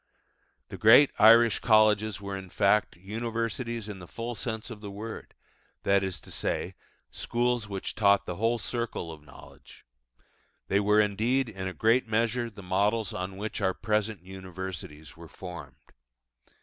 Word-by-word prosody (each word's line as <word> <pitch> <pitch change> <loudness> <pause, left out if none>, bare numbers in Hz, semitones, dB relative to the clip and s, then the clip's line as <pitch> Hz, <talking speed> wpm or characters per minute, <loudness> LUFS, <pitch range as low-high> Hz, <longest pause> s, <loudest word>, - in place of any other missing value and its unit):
The - - -8
great 125 +7 +7
Irish 115 +1 +7
colleges 110 -2 +3
were, 100 0 -5
in 95 -1 -8
fact, 100 +4 +2
universities 115 +3 -4
in 105 -2 -7
the 90 - -11
full 115 +5 -5
sense 110 +1 -5
of 105 -2 -9
the 105 - -7
word, 110 +3 -8 0.5
that 100 0 +3
is 95 -2 -3
to - - -13
say, - - -2 0.4
schools 120 -1 -1
which 100 -2 -4
taught 100 -2 +3
the 90 - -5
whole 115 +2 +1
circle 115 -8 -4
of 80 -2 -11
knowledge: 75 - -16 0.8
they 100 - +3
were, 105 +1 +3
indeed, 115 +5 +1
in 95 -3 -5
a 95 - -4
great 115 +3 +3
measure 115 +2 0
the 105 -3 -12
models 100 +4 0
on 95 +1 -5
which 105 +2 -4
our 95 - +1
present 105 -3 -1
universities 95 -5 -8
were - - -12
formed. 85 -8 -9
105 Hz, 155 wpm, -28 LUFS, 95-115 Hz, 0.8 s, great